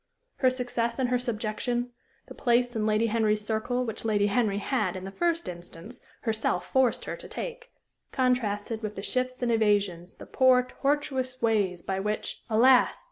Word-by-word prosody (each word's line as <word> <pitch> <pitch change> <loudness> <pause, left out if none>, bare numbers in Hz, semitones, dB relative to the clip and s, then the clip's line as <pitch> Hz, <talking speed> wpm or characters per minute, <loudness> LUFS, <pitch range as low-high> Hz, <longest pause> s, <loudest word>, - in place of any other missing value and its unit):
Her 260 - +4
success 245 -2 -2
and 260 -2 0
her 250 0 +2
subjection; 240 +1 -2 0.3
the - - -11
place 245 -1 +1
in 215 -1 0
Lady 215 +1 +2
Henry's 215 -2 +1
circle 245 +3 -1
which 225 - -5
Lady 210 -2 +2
Henry 205 -1 +1
had, 205 -3 -1
in 185 - -6
the 195 - -6
first 335 - 0
instance, 175 +6 -9 0.2
herself 220 -2 -1
forced 260 -2 +2
her - - -4
to - - -11
take, - - -7 0.4
contrasted 230 -4 0
with 210 -1 -4
the 195 - -6
shifts 255 +2 -1
and 240 - +1
evasions, 200 -6 +1
the - - -11
poor, 255 -1 +4
tortuous 265 -1 -2
ways 205 -6 +1
by 190 0 -2
which, 210 +2 -3
alas! 245 +3 +5
230 Hz, 170 wpm, -27 LUFS, 210-255 Hz, 0.4 s, alas